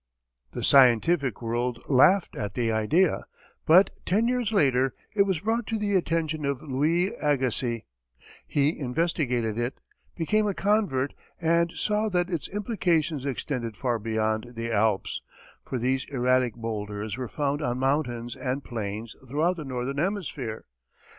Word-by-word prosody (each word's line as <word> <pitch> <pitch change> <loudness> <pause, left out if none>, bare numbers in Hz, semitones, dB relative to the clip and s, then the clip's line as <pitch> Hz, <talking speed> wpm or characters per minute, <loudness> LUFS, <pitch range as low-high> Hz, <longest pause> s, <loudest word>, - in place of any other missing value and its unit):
The - - -4
scientific 130 - +4
world 120 +1 -1
laughed 170 +8 +4
at 105 -3 -4
the 115 -2 +1
idea, 150 - +2 0.4
but 180 +5 +7
ten 215 +6 +2
years 245 -3 0
later, 135 - +2 0.2
it 200 -1 +4
was 185 -4 0
brought 225 +2 -1
to 225 - -1
the 205 -1 0
attention 160 -3 0
of 140 -2 -1
Louis 155 +7 +1
Agassiz; 130 -5 0 0.6
he 145 +2 +1
investigated 125 -6 0
it, 120 +2 -2 0.4
became 210 +6 +1
a 200 - -1
convert, 195 -11 +1 0.3
and 170 0 +2
saw 210 +1 0
that 180 -1 0
its 170 -4 -2
implications 170 - 0
extended 120 -4 -3
far 120 -3 0
beyond 110 +2 -1
the 115 0 -3
Alps, 105 -2 +1 0.4
for 130 - -4
these 130 +2 0
erratic 125 -3 +2
bowlders 105 -2 -4
were 130 -1 -4
found 145 +3 -1
on 125 -4 -1
mountains 125 -3 -1
and 130 +1 -3
plains 110 -1 -5
throughout 160 +7 +1
the 155 - -5
northern 130 +1 -3
hemisphere. 150 - -3
135 Hz, 140 wpm, -26 LUFS, 120-170 Hz, 0.6 s, but